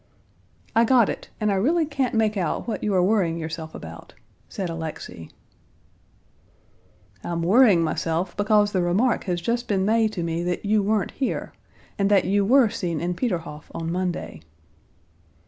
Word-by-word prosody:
"I 230 - +5
got 235 -2 +4
it, - - -6
and 210 -2 +1
I - - +1
really 315 - +2
can't 275 -5 -2
make 220 -1 +2
out 180 +1 -2
what 230 - -3
you 210 - 0
are 180 - +4
worrying 185 -4 +1
yourself 160 -1 -6
about," 80 0 -10 0.3
said 190 - -4
Alexey. 160 - -7 1.9
"I'm 170 -1 -3
worrying 200 -2 +5
myself 165 +2 -2
because 205 0 +3
the 185 - +1
remark 200 +8 +1
has 180 -3 -1
just 235 +7 -2
been 190 -2 +1
made 220 0 +2
to 175 - -3
me 165 0 -2
that 180 +3 -3
you 210 +1 +3
weren't 210 +1 0
here, 270 - -3 0.5
and 200 0 +2
that 200 -3 +4
you 200 +2 +2
were 245 +2 +5
seen 170 -7 -3
in 175 +3 -1
Peterhof 170 - -4
on 165 0 -3
Monday." 180 - -3
195 Hz, 165 wpm, -24 LUFS, 170-220 Hz, 1.9 s, I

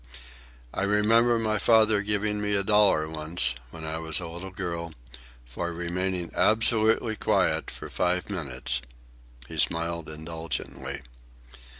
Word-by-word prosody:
"I - - -2
remember 110 +4 +4
my 110 -2 0
father 110 -1 +4
giving 105 0 -1
me 105 0 0
a 100 - +1
dollar 100 -7 +4
once, 80 -3 0 0.2
when 80 +4 -9
I 80 +1 -3
was 80 -2 +2
a 85 - -6
little 85 +3 -7
girl, 85 -4 -5 0.5
for 85 +9 -4
remaining 85 +1 -3
absolutely 110 0 +4
quiet 95 -7 +1
for - - -8
five 90 0 0
minutes." 65 -9 -3 0.7
He - - -6
smiled 85 0 -1
indulgently. 80 0 -5
90 Hz, 125 wpm, -27 LUFS, 80-105 Hz, 0.7 s, remember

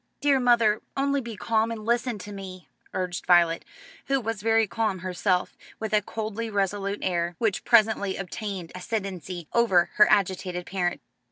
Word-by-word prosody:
"Dear 285 -2 +3
mother, 235 -4 +3 0.2
only 280 0 +1
be 230 -3 -7
calm 220 +3 +1
and 220 -2 -6
listen 235 0 0
to 205 +1 -9
me," 185 -5 -9 0.2
urged 180 -1 -3
Violet, 170 -2 +4 0.4
who 275 0 +2
was 225 -3 -4
very 225 +1 +3
calm 215 -1 -1
herself, 180 0 0 0.2
with 220 -1 -4
a 210 - +4
coldly 220 +2 -4
resolute 200 0 -1
air 175 -1 -1
which 220 -4 0
presently 215 -4 +3
obtained 195 -2 -5
ascendency 185 -4 -4
over 190 -8 +3
her 210 - +8
agitated 185 -3 +1
parent. 180 -2 -2
205 Hz, 155 wpm, -26 LUFS, 185-225 Hz, 0.4 s, her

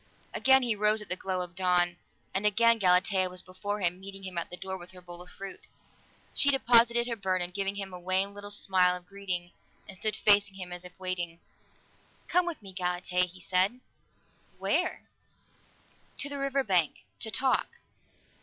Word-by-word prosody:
Again 265 0 +5
he 235 -3 +1
rose 210 +1 +3
at - - -17
the 180 - 0
glow 185 -1 -2
of 175 -1 -4
dawn, 175 -1 +2 0.4
and 195 - -1
again 230 +2 +4
Galatea 185 0 +4
was 180 0 -3
before 205 +3 -5
him, 175 0 0
meeting 195 0 -7
him 185 -1 -7
at 170 - -2
the 180 - -6
door 190 +2 -5
with 175 -1 -9
her 185 - -12
bowl 175 0 -6
of 180 - -12
fruit. 195 +1 -8 0.7
She 285 - +4
deposited 235 -3 +5
her 240 -1 -2
burden, 185 -3 -1
giving 195 +1 -1
him 195 -2 -6
a 180 - -7
wan 185 +3 +1
little 205 0 -7
smile 185 -3 +2
of 180 - -16
greeting, 180 -3 -4 0.4
and 195 - -10
stood 215 +3 0
facing 205 -1 +4
him 185 -2 -7
as 180 0 -5
if 180 -1 -9
waiting. 175 -2 -3 0.9
"Come 360 0 +2
with 330 -10 -5
me, 195 -1 -9
Galatea," 180 0 0
he 180 +1 -12
said. 185 +7 +1 0.8
"Where?" - - 0 1.1
"To 285 - 0
the 285 0 -3
river 275 0 0
bank. 180 - +1
To 220 - -1
talk." 260 +4 +2
190 Hz, 180 wpm, -29 LUFS, 180-210 Hz, 1.1 s, Again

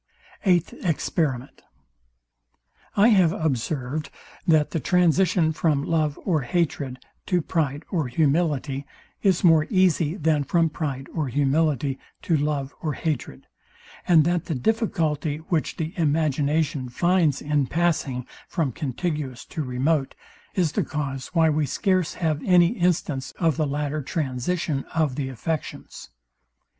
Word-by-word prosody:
Eighth 175 -2 +3
Experiment. 145 -5 -1 1.4
I 210 +4 +6
have 185 -7 +5
observed 145 0 -2 0.4
that 155 -3 +4
the 165 - -1
transition 175 +1 +3
from 150 -3 +1
love 155 -2 0
or 165 -6 +2
hatred 140 -2 -1 0.3
to 180 - +2
pride 150 -3 -1
or 160 -7 0
humility, 145 0 0 0.4
is 190 -4 +2
more 165 -3 +5
easy 180 -5 +2
than 155 -4 +1
from 165 +3 +2
pride 140 -4 -4
or 155 -4 -1
humility 140 0 +1 0.2
to 165 - +2
love 145 -2 -1
or 155 -2 -1
hatred; 155 -5 -4 0.6
and 165 -3 +6
that 175 +1 0
the 160 - -2
difficulty, 155 - 0
which 160 0 -2
the 160 +1 -3
imagination 150 -3 0
finds 170 +1 +2
in 145 -2 0
passing 150 -7 0 0.2
from 160 -7 -1
contiguous 145 -1 -3
to 155 - -5
remote, 135 +2 0 0.4
is 175 -5 +2
the - - 0
cause 135 -4 -4
why 165 -1 +5
we 150 -1 +1
scarce 185 - 0
have 155 -4 -1
any 175 -2 +5
instance 170 - -1
of 165 -4 +2
the 155 -2 0
latter 145 +1 -2
transition 140 +2 -2
of 155 -5 +2
the 135 0 -3
affections. 150 +5 -5
155 Hz, 130 wpm, -24 LUFS, 140-170 Hz, 1.4 s, I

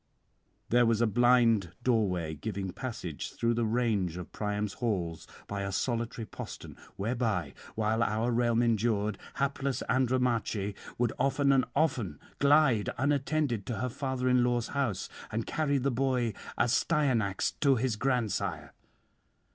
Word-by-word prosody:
'There 120 +1 +5
was 115 -1 +2
a 120 - +4
blind 115 -5 +3
doorway 95 -10 +1
giving 95 +4 -4
passage 95 - -5
through 115 0 +1
the 115 -1 0
range 110 -7 0
of 90 - -7
Priam's 105 -1 -2
halls 90 -8 -2 0.2
by 100 -1 -4
a 100 0 -3
solitary 115 +2 -2
postern, - - -8 0.2
whereby, 105 - -1 0.2
while 110 +1 +1
our 115 +1 +1
realm 120 0 +2
endured, 110 -3 +1 0.2
hapless 140 0 -1
Andromache 120 -5 +1 0.2
would 120 -2 +1
often 140 0 +2
and 135 -1 +4
often 120 - 0 0.2
glide 140 -6 +4
unattended 140 -3 0
to 120 - -2
her 125 - -1
father 130 0 -2
in 125 -1 +4
law's 120 -1 0
house, 120 -9 -1 0.2
and 110 +1 -2
carry 145 -3 0
the 135 +1 0
boy 125 -2 0 0.2
Astyanax 120 - +2
to 140 -3 +5
his 125 -1 0
grandsire. 105 - -1
115 Hz, 135 wpm, -30 LUFS, 105-130 Hz, 0.2 s, There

